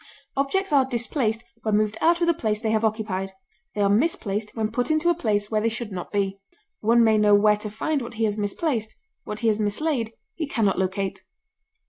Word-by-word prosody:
Objects 300 +6 0
are 275 -2 +6
displaced 235 -2 -1 0.2
when 215 -1 +1
moved 215 0 +1
out 340 +2 +3
of - - +4
the 340 - +4
place 215 -7 -1
they 220 -1 -1
have 220 0 +1
occupied; 210 -3 -1 0.4
they 205 - 0
are 200 - +4
misplaced 210 -3 0
when 220 -1 -1
put 245 +4 -1
into 310 +2 +3
a - - +3
place 210 -9 -1
where 215 -1 +1
they 230 - +2
should 230 -1 -5
not 180 -2 -6
be. 195 -1 -1 0.4
One 230 +2 +4
may 220 -1 +4
know 210 -1 +5
where 210 +1 +4
to 210 0 -5
find 275 +8 -1
what 235 -1 -7
he 225 - -1
has 210 -2 +1
misplaced; 220 +2 -2 0.3
what 210 +1 -5
he 230 - +1
has 215 -1 +2
mislaid 230 +2 -1 0.2
he 315 -4 -4
can 225 -6 0
not 195 -2 +1
locate. 190 +1 -2
220 Hz, 215 wpm, -24 LUFS, 210-245 Hz, 0.4 s, are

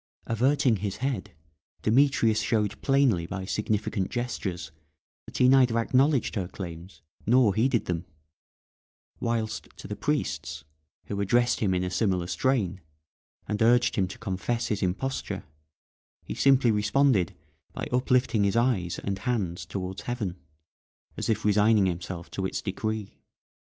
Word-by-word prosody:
Averting 125 0 +2
his 100 0 -3
head, 120 -8 -3 0.5
Demetrius 115 -2 +3
showed 105 -3 0
plainly 135 -12 +2
by 95 +1 -5
significant 105 -1 -1
gestures 110 -9 -4 0.6
that - - -7
he 125 - +5
neither 130 -3 +5
acknowledged 130 +4 +2
her 95 -5 -2
claims, 90 -1 -9 0.2
nor 120 -3 +5
heeded 120 +3 +1
them; 90 0 -2 1.1
whilst 115 -2 -2
to - - -9
the - - -4
priests, 75 +2 -2 0.4
who 100 0 -3
addressed 120 +5 +2
him 95 -4 +1
in 90 - 0
a 90 - -2
similar 90 -3 +1
strain, 95 0 0 0.7
and 105 0 -2
urged 120 +1 +4
him 95 -2 +1
to 95 - -9
confess 115 +2 -2
his 105 -2 -1
imposture, 105 +9 -2 0.8
he - - -5
simply 135 -3 +4
responded 105 -3 +2 0.4
by - - -5
uplifting 125 -3 +2
his 100 +1 +1
eyes 115 -8 +1
and 100 -1 -3
hands 95 -7 -2
towards 95 -1 -5
heaven, 110 -8 -3 0.8
as - - -3
if 110 -2 0
resigning 105 0 +4
himself 90 -1 -4
to 95 -1 -2
its - - -3
decree. 110 +1 -4
105 Hz, 135 wpm, -27 LUFS, 95-120 Hz, 1.1 s, he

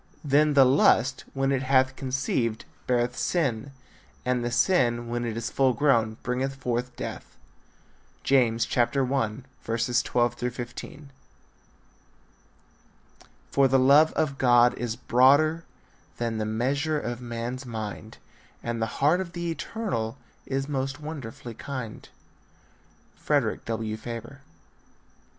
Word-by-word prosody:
Then 150 +1 +3
the 135 -2 +8
lust, 130 -1 +3
when 135 0 +1
it 135 -1 +1
hath 130 0 +3
conceived, 130 -4 -2 0.2
beareth 125 0 +1
sin: 140 -7 -1 0.5
and 125 -1 0
the 120 - -1
sin, 120 -4 +2
when 120 0 -2
it 115 -1 -3
is 115 +1 -3
full 130 -2 +3
grown, 115 -6 +2
bringeth 130 +2 -2
forth 125 -1 -3
death. - - -7 0.9
James 120 -4 +3
1:12 120 -1 0
15. 125 +4 -8 2.4
For 140 -1 +4
the 135 +1 +3
love 140 +4 +6
of 140 -3 -1
God 120 -1 +5
is 120 -2 -3
broader 140 +7 +3 0.5
Than 115 -2 -2
the 110 - -1
measure 140 +8 0
of 120 -2 -5
man's 120 +2 -5
mind, 110 -1 -6 0.5
And 115 -1 -3
the 115 - +1
heart 155 +6 +3
of 170 -3 -7
the 170 -1 -3
eternal 160 - -3 0.3
Is 135 0 -2
most 135 -1 -3
wonderfully 140 -6 -7
kind. 125 -2 -7 1.1
Frederick - - 0
W. 110 -1 -3
Faber. 120 +4 -8
125 Hz, 115 wpm, -26 LUFS, 120-140 Hz, 2.4 s, the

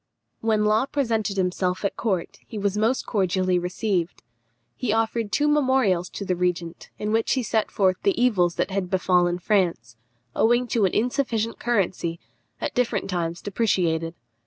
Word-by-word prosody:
When 220 -1 +1
Law 215 +5 +2
presented 225 -8 -1
himself 180 +1 0
at 200 - -1
court 190 -7 -2
he 220 - -7
was 200 -1 0
most 225 +5 +1
cordially 185 -3 +1
received. 180 0 -2 0.5
He 245 -5 -2
offered 225 -1 0
two 295 +6 +2
memorials 260 -12 +2
to 200 - -6
the 185 - 0
regent, 175 -1 -2
in 210 0 -2
which 225 0 +2
he 260 - 0
set 220 -1 0
forth 190 -2 +2
the 395 -8 +1
evils 185 -9 +3
that - - -1
had 190 -2 -2
befallen 180 -2 +2
France, 170 - 0 0.4
owing 240 +2 +3
to 220 -3 +2
an 185 - 0
insufficient 230 -2 0
currency, 185 -7 -1 0.4
at - - -3
different 235 -5 0
times 170 -1 -2
depreciated. 170 -6 0
200 Hz, 160 wpm, -24 LUFS, 180-225 Hz, 0.5 s, evils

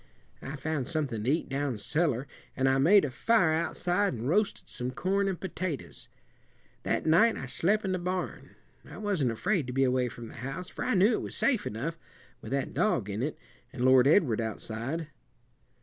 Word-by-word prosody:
I 140 - -6
found 145 -2 -3
something 140 -10 -2
to 120 - 0
eat 155 +4 +1
down 135 -3 -2
cellar, 145 +1 0 0.3
and 135 0 +2
I 135 0 +3
made 185 +6 +6
a 140 - -4
fire 205 - +3
outside 175 +2 0
an' 115 +1 -5
roasted 200 +9 0
some 125 0 -4
corn 195 +9 0
and 190 -3 -2
potatoes. 185 -4 -5 0.7
That - - -1
night 185 +9 +4
I - - -5
slep' 200 +11 +1
in 190 - -1
the 185 - -1
barn. 180 +1 -4 0.3
I - - -11
wasn't 195 - 0
afraid 150 - 0
to 125 - -4
be 135 +1 +2
away 125 -1 +2
from 120 -1 -9
the - - -12
house 135 +9 -5
for - - -5
I 255 - +1
knew 195 +5 +5
it - - 0
was - - -6
safe 245 -7 +1
enough, 160 +10 -4 0.4
with - - -8
that 140 -1 -1
dog 120 - +1
in 105 +3 -3
it, 150 +4 -2 0.3
and 125 -1 -2
Lord 130 0 +6
Edward 140 - +4
outside. 115 +8 -4
150 Hz, 195 wpm, -29 LUFS, 125-185 Hz, 0.7 s, made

